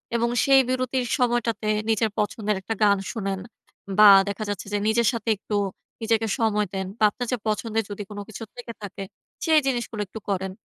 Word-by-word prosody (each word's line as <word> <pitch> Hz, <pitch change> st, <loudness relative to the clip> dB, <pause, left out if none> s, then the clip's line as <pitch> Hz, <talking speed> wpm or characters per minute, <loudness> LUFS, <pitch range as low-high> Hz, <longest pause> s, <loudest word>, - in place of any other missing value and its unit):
এবং 235 Hz, 0 st, +1 dB, 0.2 s
সেই 270 Hz, -1 st, +7 dB
বিরতির 255 Hz, 0 st, 0 dB
সময়টাতে 235 Hz, -4 st, 0 dB, 0.2 s
নিজের 220 Hz, 0 st, +2 dB
পছন্দের 210 Hz, 0 st, -1 dB
একটা 225 Hz, -, -3 dB
গান 200 Hz, -1 st, +5 dB
শোনেন 195 Hz, -4 st, -3 dB, 0.6 s
বা 210 Hz, -, +10 dB, 0.2 s
দেখা 200 Hz, +2 st, -4 dB
যাচ্ছে 205 Hz, -2 st, -4 dB
যে, -, -, +2 dB
নিজের 225 Hz, +1 st, +3 dB
সাথে 230 Hz, -1 st, -3 dB
একটু 210 Hz, 0 st, -2 dB, 0.5 s
নিজেকে 225 Hz, 0 st, +1 dB
সময় 210 Hz, -2 st, +1 dB
দেন 190 Hz, 0 st, -2 dB
বা -, -, -1 dB
আপনার 245 Hz, +3 st, -5 dB
যে 250 Hz, -, +1 dB
পছন্দের 220 Hz, +1 st, 0 dB
যদি 205 Hz, 0 st, -5 dB
কোন 205 Hz, -1 st, -7 dB
কিছু 220 Hz, +1 st, -7 dB
থেকে 240 Hz, -1 st, -7 dB
থাকে, 195 Hz, -1 st, -6 dB, 0.4 s
সেই 320 Hz, -2 st, +5 dB
জিনিসগুলো 240 Hz, -4 st, -2 dB
একটু 220 Hz, -, -8 dB
করেন। 190 Hz, -1 st, -1 dB
220 Hz, 180 wpm, -24 LUFS, 205-235 Hz, 0.6 s, বা